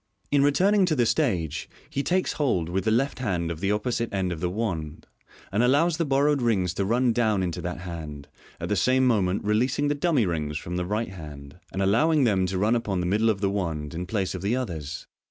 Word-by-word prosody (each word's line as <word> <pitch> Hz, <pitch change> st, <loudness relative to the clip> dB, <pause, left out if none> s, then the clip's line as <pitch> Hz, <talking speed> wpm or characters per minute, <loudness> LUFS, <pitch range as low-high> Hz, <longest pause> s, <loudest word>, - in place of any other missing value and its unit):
In 145 Hz, -1 st, +4 dB
returning 185 Hz, +7 st, +3 dB
to 160 Hz, -, +1 dB
the 120 Hz, -4 st, +2 dB
stage, 85 Hz, -, 0 dB, 0.2 s
he 140 Hz, -, -2 dB
takes 185 Hz, +5 st, 0 dB
hold 95 Hz, -, 0 dB
with 95 Hz, +3 st, -1 dB
the -, -, +3 dB
left 130 Hz, +6 st, +1 dB
hand 90 Hz, -8 st, -1 dB
of 80 Hz, -, -5 dB
the 95 Hz, +3 st, 0 dB
opposite 115 Hz, +2 st, -1 dB
end 95 Hz, -2 st, -1 dB
of 85 Hz, -, -4 dB
the 90 Hz, -, -1 dB
wand, 85 Hz, -7 st, -3 dB, 0.5 s
and 100 Hz, +4 st, +1 dB
allows 145 Hz, +7 st, +3 dB
the 165 Hz, -, 0 dB
bor 140 Hz, +1 st, +2 dB
rowed 145 Hz, -2 st, +2 dB
rings 95 Hz, -8 st, +1 dB
to 100 Hz, +2 st, -1 dB
run 120 Hz, +3 st, +2 dB
down 110 Hz, -5 st, +1 dB
into 85 Hz, -2 st, -3 dB
that 90 Hz, -1 st, -5 dB
hand, 80 Hz, -5 st, -7 dB, 0.3 s
at -, -, -4 dB
the -, -, +1 dB
same 130 Hz, +1 st, +3 dB
moment 100 Hz, -6 st, +1 dB
releasing 125 Hz, +7 st, +1 dB
the -, -, +2 dB
dummy 145 Hz, -5 st, +2 dB
rings 75 Hz, -4 st, -2 dB
from 85 Hz, +3 st, -5 dB
the 90 Hz, 0 st, -2 dB
right 105 Hz, +3 st, -1 dB
hand, 75 Hz, -4 st, -10 dB
and 95 Hz, -, -1 dB
allowing 145 Hz, +10 st, +3 dB
them 95 Hz, -6 st, +2 dB
to 95 Hz, +1 st, -2 dB
run 105 Hz, +5 st, +2 dB
upon 105 Hz, -5 st, -1 dB
the 90 Hz, -, -1 dB
middle 105 Hz, +5 st, +2 dB
of 100 Hz, -3 st, 0 dB
the 100 Hz, -, +2 dB
wand 80 Hz, -6 st, -3 dB
in 90 Hz, +2 st, -4 dB
place 95 Hz, -2 st, -1 dB
of 95 Hz, -, -5 dB
the 100 Hz, +5 st, 0 dB
others. 80 Hz, -, -4 dB
100 Hz, 230 wpm, -26 LUFS, 90-125 Hz, 0.5 s, In